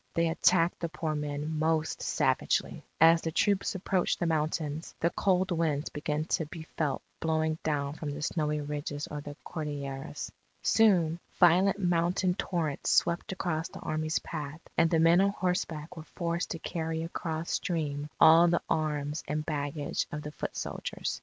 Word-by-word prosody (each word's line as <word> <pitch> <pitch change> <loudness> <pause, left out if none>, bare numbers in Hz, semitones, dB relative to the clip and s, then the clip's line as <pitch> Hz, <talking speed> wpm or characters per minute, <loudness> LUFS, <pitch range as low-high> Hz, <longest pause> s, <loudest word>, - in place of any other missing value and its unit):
They 165 0 +2
attacked 170 +1 +3
the 170 - -2
poor 160 -2 -2
men 150 +1 -3
most 160 0 0
savagely. - - +1 0.2
As 165 +1 +7
the 160 - -2
troops 200 +4 +1
approached 185 -1 0
the - - 0
mountains, 155 -1 -1
the 170 - +2
cold 190 -1 +1
winds 160 -4 0
began 150 +1 -2
to 160 -2 0
be 160 +1 -8
felt 150 -4 -1 0.2
blowing 160 0 0
down 145 -2 -1
from 155 -1 -5
the 145 +1 -5
snowy 150 -1 0
ridges 145 0 -4
of 150 -1 -7
the 145 - -7
Cordilleras. 145 -2 -5 0.3
Soon, 175 -7 +4 0.2
violent 185 +3 +5
mountain 180 0 +1
torrents 165 -6 -2
swept 170 +2 +2
across 165 -4 -2
the - - -10
Army's 155 0 -1
path; 155 -1 -5
and 165 - +4
the 165 - +3
men 165 +3 +6
on 200 - +4
horseback 180 -5 -2
were 160 - -7
forced 170 +1 -3
to 165 - -3
carry 160 -1 -3
across 165 -1 -4
stream 150 -4 -2
all 165 +2 +8
the 170 0 +1
arms 150 -1 -1
and 150 +1 -2
baggage 145 -1 -2
of 150 -1 -4
the 150 - -6
foot - - -5
soldiers. - - -4
160 Hz, 165 wpm, -30 LUFS, 150-170 Hz, 0.3 s, all